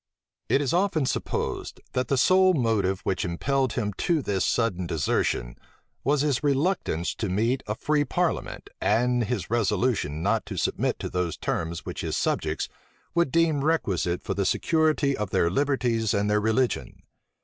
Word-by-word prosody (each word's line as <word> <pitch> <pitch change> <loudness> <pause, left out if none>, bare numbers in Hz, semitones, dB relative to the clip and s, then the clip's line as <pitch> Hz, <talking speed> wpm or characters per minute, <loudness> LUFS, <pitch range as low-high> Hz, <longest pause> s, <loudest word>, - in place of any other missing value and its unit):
It 140 - +3
is 145 +2 0
often 175 -5 +2
supposed, - - -3
that 125 0 0
the 135 - +1
sole 185 +6 +5
motive 110 -7 +1
which 95 - -1
impelled 130 +10 0
him 105 -4 -2
to 165 -5 +1
this 100 -4 0
sudden 95 -7 0
desertion, 70 -6 -1 0.5
was 145 +1 +2
his 145 -3 0
reluctance 140 - 0
to 110 -3 -3
meet 115 +8 +1
a 105 - -2
free 150 +4 +1
parliament 135 - -2
and 120 +2 +2
his 105 -5 -3
resolution 110 - 0
not 110 +3 +1
to 100 -3 -5
submit - - 0
to - - -3
those 90 -3 -1
terms 80 +1 -3
which - - -5
his - - -2
subjects 80 0 -1 0.5
would 170 -5 +2
deem 160 -4 +2
requisite 95 - 0
for - - -2
the 100 - 0
security 155 - +2
of 105 -2 -3
their 85 -2 +2
liberties 120 -4 +1
and 105 +1 +1
their 105 0 +2
religion. 110 +4 0
120 Hz, 160 wpm, -26 LUFS, 95-145 Hz, 0.5 s, sole